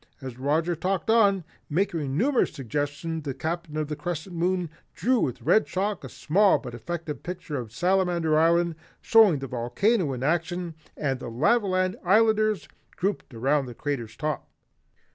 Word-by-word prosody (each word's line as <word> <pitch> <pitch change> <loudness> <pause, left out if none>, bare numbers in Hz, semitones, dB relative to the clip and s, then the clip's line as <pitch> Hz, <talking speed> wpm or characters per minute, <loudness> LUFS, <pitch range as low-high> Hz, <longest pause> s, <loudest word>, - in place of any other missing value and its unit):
As 130 -3 -8
Roger 160 +6 +1
talked 185 +4 -1
on, 200 -5 +4 0.3
making 160 -5 -1
numerous 260 +4 +2
suggestions, 145 +5 -3
the 140 -3 -4
Captain 160 +2 -4
of 155 -1 -1
the 150 - -3
Crescent 175 +2 -5
Moon 175 -1 0 0.2
drew 240 +9 +2
with 125 - -2
red 220 - +4
chalk 200 +2 -2
a - - -7
small 195 +6 +3
but 125 - -8
effective 165 +4 -5
picture 180 -4 -6
of 120 -4 -6
Salamander 175 0 +1
Island 170 +2 +3 0.3
showing 220 -8 +5
the 135 0 -5
volcano 140 - +1
in 125 0 -5
action 170 +3 -1 0.2
and 135 -3 -1
the 125 - -6
Lavaland 185 - +1
Islanders 215 0 +3 0.3
grouped 195 -4 -2
around 135 +4 +1
the 120 - -8
crater's 120 -6 -4
top. 155 -1 -3
165 Hz, 155 wpm, -26 LUFS, 145-185 Hz, 0.3 s, showing